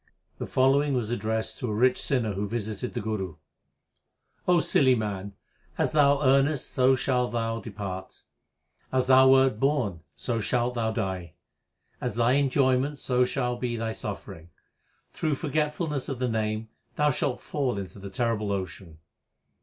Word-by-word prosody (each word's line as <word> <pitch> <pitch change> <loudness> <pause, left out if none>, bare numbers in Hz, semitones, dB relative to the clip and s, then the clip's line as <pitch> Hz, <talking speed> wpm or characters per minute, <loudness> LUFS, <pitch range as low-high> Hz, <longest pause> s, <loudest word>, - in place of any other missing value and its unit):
The - - -4
following 135 +2 +3
was 120 -3 -1
addressed 110 -1 -2
to 125 -5 -3
a - - -1
rich 125 +3 +3
sinner 120 -6 0
who 100 +2 -2
visited 110 -2 -4
the - - -1
Guru: 100 -6 -3 1.1
O 180 -1 +5
silly 130 -4 +4
man, 100 -3 -4 0.4
as - - +1
thou 145 -1 +4
earnest 135 +1 +2
so 130 +1 +4
shall 125 -1 +1
thou 115 -1 -2
depart; 95 -4 -7 0.7
as 130 -1 +2
thou 130 0 +7
wert 130 -4 +4
born 130 - +1 0.2
so 115 +11 -2
shalt 120 +3 0
thou 115 -2 0
die; 95 -7 -3 0.7
As - - -2
thy 120 +1 +3
enjoyment 135 0 +2
so 125 -2 +2
shall 125 -1 -1
be 120 -1 -2
thy 115 0 -2
suffering; 95 -6 -7 0.6
through 155 -2 -1
forgetfulness 150 -1 -1
of 135 - -3
the 125 +1 -1
Name 110 -1 -2 0.3
thou 150 0 +3
shalt 125 -1 -1
fall 135 -7 -2
into 100 +1 -7
the 100 0 -7
terrible 110 0 -1
ocean. 95 -4 -5
120 Hz, 155 wpm, -27 LUFS, 105-135 Hz, 1.1 s, thou